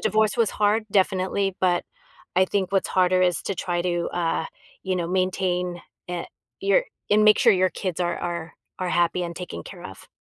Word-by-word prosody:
divorce 215 +1 +2
was 230 -3 +2
hard, 210 +1 +1
definitely, 190 0 +1
but 180 -2 +2 0.5
I 185 - +6
think 190 -1 -1
what's 195 - +1
harder 185 0 +3
is 180 -4 +2
to 195 - -3
try 175 0 -1
to, 175 -1 -1
uh, 165 -2 -1 0.4
you 190 -1 0
know, 170 -2 -2
maintain, 180 -1 0 0.3
eh, 175 -1 -3 0.4
your 400 +6 +3 0.3
and 210 +1 +5
make 215 - +6
sure - - +6
your 185 -1 +2
kids 185 -3 -4
are 175 -1 0
are 170 -2 -4 0.2
are 185 - -2
happy 175 +1 +2
and 170 -1 -4
taken 175 - -6
care - - -11
of. - - -10
185 Hz, 190 wpm, -24 LUFS, 175-195 Hz, 0.5 s, I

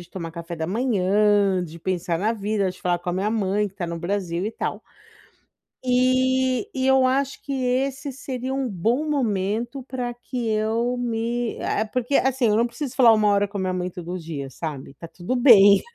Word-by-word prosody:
de 175 - -13
tomar 170 -3 -6
café 170 +1 -7
da 160 -1 -3
manhã, 205 -3 +2
de 170 0 -10
pensar 180 -1 -1
na 215 +4 +1
vida, 205 -3 -1
de 185 - -13
falar 175 -1 0
com 175 - -3
a - - -3
minha 195 +4 -1
mãe 210 -1 0
que 195 - -23
tá 185 -4 -4
no 170 0 -4
Brasil 180 0 -2
e 220 - -4
tal. - - -4 1.0
E 255 +4 +2
e 260 - 0
eu 265 -1 +5
acho 270 +1 -1
que 280 - -6
esse 265 +2 -1
seria 260 -1 -5
um 270 -2 -1
bom 225 - 0
momento 230 0 -1
pra 245 -2 -4
que 245 0 -5
eu 220 +3 0
me 235 0 -2
eh, 215 - 0
porque, 250 +4 -2
assim, 260 -3 +2
eu 210 - +3
não 230 +2 +3
preciso 250 +2 -6
falar 245 -3 +7
1, 215 -1 +3
hora 205 0 +2
com 200 +1 -7
a - - -2
minha 185 -1 -1
mãe 180 0 -2
todo 180 0 -6
dia, 155 -5 -6
sabe. 140 -1 -6
Tá 165 - -10
tudo 175 +9 -4
bem. 205 -6 +7
215 Hz, 205 wpm, -23 LUFS, 185-250 Hz, 1.0 s, falar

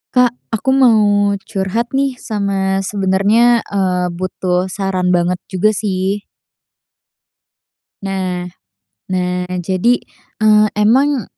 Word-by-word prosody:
Kak, 250 -1 +4 0.2
aku 225 - -2
mau 250 -5 +5 0.4
curhat 220 +4 -3
nih, 270 -1 0
sama 200 -4 -1
sebenernya, 200 +5 +2
eee, 185 -2 0
butuh 185 0 -2
saran 185 -2 -1
banget 175 0 +1 0.2
juga 210 +3 +1
sih. 195 0 -2 1.8
Nah, 185 -2 -3 0.6
nah, 180 -1 -2 0.2
jadi, 190 +7 +2 0.5
eee, 215 0 +5
emang 250 +5 +2
195 Hz, 95 wpm, -16 LUFS, 185-220 Hz, 1.8 s, mau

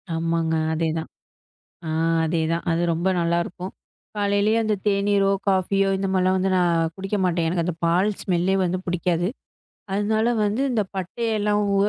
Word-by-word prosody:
ஆமாங்க. 165 0 0 0.2
அதே 160 0 0
தான். 160 - -5 0.8
ஆ - - -3 0.4
அதேதான். 165 +1 0
அது 165 +1 +1
ரொம்ப 175 +4 0
நல்லா 170 0 +1
இருக்கும். 180 +2 -7 0.4
காலையிலே 205 +1 +2
அந்த 215 -1 +1
தேனீரோ, 200 -1 +2 0.2
காஃபியோ 195 +1 +2
இந்த 195 - -1
மாரிலா 185 0 +2
வந்து 190 +1 +1
நா 180 - +3 0.3
குடிக்க 195 +2 -3
மாட்டேன். 170 -2 +1
எனக்கு 170 0 0
அந்த 180 -2 -2
பால் 180 +5 +3
ஸ்மெல்லே 185 +1 +1
வந்து 180 0 0
புடிக்காது. 175 0 0 0.7
அதுனால 215 +3 +1
வந்து 210 +5 0
இந்த 225 -3 +1
பட்டை, 190 +5 -3 0.2
லவங்கு 205 -1 +2
185 Hz, 150 wpm, -23 LUFS, 170-200 Hz, 0.8 s, நா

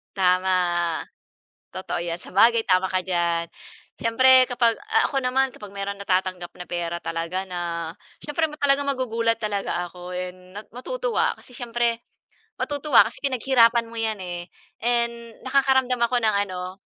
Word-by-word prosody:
Tama, 185 0 +2 1.2
totoo 185 -2 -4
‘yan. 170 0 -4
Sabagay 230 +6 +3
tama 185 0 +3
ka 185 - +2
diyan. 170 -2 0 0.5
Siyempre, 260 +3 +6
kapag 235 -2 +2
ah, - - +2
ako 270 -2 -1
naman. 260 +1 +1
Kapag 205 -2 -10
merong 200 0 -4
natatanggap 185 -2 -1
na 180 - -7
pera, 170 -1 -2
talaga 170 +3 -3
na 170 -2 -4 0.3
siyempre 320 +2 0
ma 300 - -9
talagang 280 0 +2
magugulat 230 -4 0
talaga 200 -5 -2
ako, 180 +1 -10
and 180 0 -5 0.2
nat 210 - -8
matutuwa, - - -1
kasi 250 - -16
siyempre 235 -1 -1 0.6
matutuwa 285 -7 +4
kasi - - -14
pinaghirapan 240 -3 +3
mo 230 - -9
‘yan, 220 -2 -1
eh, 175 -1 -6 0.4
and 235 -1 -1
nakakaramdam 265 -1 +3
ako 235 +1 +2
ng 215 -2 +2
ano, 185 0 -6
225 Hz, 145 wpm, -24 LUFS, 185-250 Hz, 1.2 s, Siyempre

